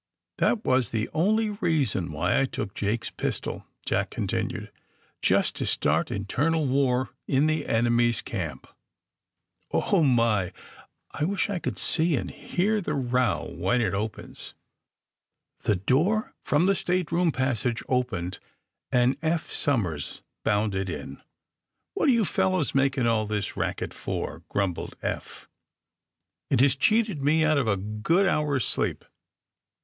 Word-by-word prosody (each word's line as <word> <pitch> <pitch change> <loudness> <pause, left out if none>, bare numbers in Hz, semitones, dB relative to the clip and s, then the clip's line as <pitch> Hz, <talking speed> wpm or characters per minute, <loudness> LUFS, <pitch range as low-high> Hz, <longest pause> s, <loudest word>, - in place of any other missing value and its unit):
*'That 220 - +2
was 130 -4 +3
the 110 -1 -1
only 210 +6 +2
reason 155 - 0
why 85 - +1
I - - +3
took 100 -6 -5
Jake's 105 +3 -2
pistol," - - -4 0.2
Jack - - 0
continued; - - -3 0.5
^^just - - +3
to - - -3
start 75 +3 +1
internal 145 +10 0
war 130 -1 +1 0.2
in 140 +2 +3
the 155 0 0
enemy's 120 0 +2
camp. - - -4 1.0
Oh, 195 - +2
my! 115 - +2 0.6
I 150 - -1
wish 200 +3 0
I 190 - -1
could - - -3
see 165 -1 +2
and - - -3
hear 210 +4 0
the 155 -5 -2
row 125 -3 0
when 95 +8 +1
it 110 - +1
opens!" 105 +2 -5 1.1
The 105 -2 +3
door 155 - +1
from 150 +5 +2
the 195 - +4
stateroom 180 -2 +1
passage 125 -3 -1
opened, 115 -9 -1 0.5
and 125 +1 +3
Eph 160 0 -1
Somers 95 - -1 0.2
bounded 105 -2 0
in. 70 -5 -6 0.7
What - - +2
are - - +7
you 230 -4 +3
fellows 185 -5 +1
making 135 -2 +2
all 110 -2 +2
this 105 -1 -2
racket - - -2
for!" 80 +2 -4
grumbled 95 -4 -2
Eph. - - -5 1.0
^^It - - +3
has 135 0 +5
cheated 210 +2 +2
me 155 +3 +3
out 155 -2 +3
of 130 - 0
a 100 -2 +2
good 105 - +1
hour 150 -6 +1
's - - 0
sleep - - -1
130 Hz, 140 wpm, -26 LUFS, 105-160 Hz, 1.1 s, are